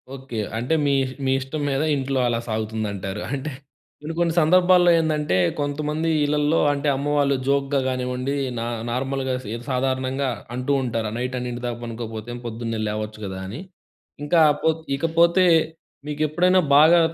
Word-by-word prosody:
Okay. 135 -3 -8 0.2
అంటే, 125 +7 -1
మీ 140 - +2 0.3
మీ 130 - +2
ఇష్టం 135 +3 -5
మీద 135 0 0
ఇంట్లో, 135 -1 -1
అలా 115 -1 0
సాగుతుందంటారు. 105 -3 -3
అంటే, 140 +2 -3 0.5
కొన్ని, 155 +2 -5
కొన్ని 170 -1 +2
సందర్భాల్లో 180 +2 +5
ఏందంటే, 155 - 0 0.2
కొంతమంది 150 +2 -1 0.2
ఇళ్లల్లో 150 +2 +2
అంటే, 145 +1 -2
అమ్మవాళ్ళు 145 0 +1
జోక్‌గా 140 0 +1
గానివ్వండి, 125 +1 -2 0.2
నా 115 - -2 0.3
నార్మల్‍గా 130 +1 -2
సిద 110 +3 -5
సాధారణంగా 130 +1 0 0.3
అంటూ 125 +3 -1
ఉంటారు. 115 -3 -2
"నైట్ 125 +1 -3
అన్నింటి 125 -1 -5
దాకా 120 -1 -3
పనుకోకపోతే, 115 0 -6
పొద్దున్నే 115 -1 -4
లేవచ్చు 105 0 -4
కదా!" 95 -1 -5
అని. 110 +9 -7 0.6
ఇంకా 165 +3 +3 0.2
పో 160 - +3 0.3
ఇకపోతే 170 +4 +3 0.6
మీకు 150 0 -4
ఎప్పుడైనా, 180 +5 +3 0.2
బాగా 160 +4 +7
135 Hz, 140 wpm, -23 LUFS, 120-150 Hz, 0.6 s, బాగా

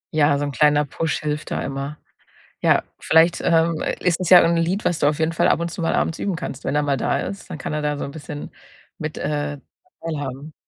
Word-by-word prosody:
Ja, 145 -2 +4
so 145 - -2
'n 145 - -3
kleiner 150 +1 +3
Push 155 +3 -2
hilft 150 0 -3
da - - -2
immer. 140 +2 -4 0.6
Ja, - - +4 0.2
vielleicht, 165 +2 +4
ähm, 165 -1 +2 0.2
ist 180 -1 +1
es 185 -1 -2
ja 180 - +10
irgend 170 0 +3
'n 165 - +2
Lied, 185 +5 -1
was 175 - +1
du 145 - +1
auf 150 +1 0
jeden 160 +1 +1
Fall 165 - +2
ab - - +3
und 170 - -2
zu 170 - -8
mal - - +1
abends 165 - 0
üben 195 -3 -2
kannst. 165 -5 -6
Wenn - - -1
er 150 - +2
mal 140 -2 0
da - - 0
ist, 200 - -6
dann 155 - -6
kann - - -4
er 150 -1 -2
da 145 -1 -1
so - - -3
'n - - -6
bisschen 145 -1 -7 0.5
mit, 155 0 -5
äh, 145 -1 -2 0.4
teilhaben. 145 -2 -5
155 Hz, 245 wpm, -22 LUFS, 145-165 Hz, 0.6 s, ja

